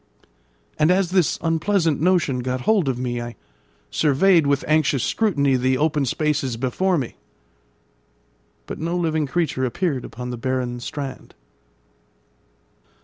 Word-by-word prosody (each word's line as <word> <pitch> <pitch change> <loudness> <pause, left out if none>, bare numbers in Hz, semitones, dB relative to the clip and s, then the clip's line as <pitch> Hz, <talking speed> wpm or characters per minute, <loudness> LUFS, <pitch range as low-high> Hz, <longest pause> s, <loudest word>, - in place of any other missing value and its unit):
And 155 +1 +4
as 180 -1 +2
this 185 -4 +2
unpleasant 165 -1 +1
notion 170 -7 +2
got 125 +1 -2
hold 200 -6 +2
of 130 - -1
me, 120 -1 -3
I 120 0 -7 0.6
surveyed 160 +2 +3
with 140 0 +1
anxious 155 -4 +2
scrutiny 145 -12 +1
the 130 +1 +1
open 150 -1 +1
spaces 145 -3 -1
before 170 +10 0
me; 130 -5 -4 1.5
but - - -7
no 170 +2 -2
living 160 -3 0
creature 155 -3 -1
appeared 130 +1 -1
upon 125 +1 -7
the 125 - -5
barren 125 0 -2
strand. 135 +2 -7
145 Hz, 130 wpm, -22 LUFS, 130-170 Hz, 1.5 s, And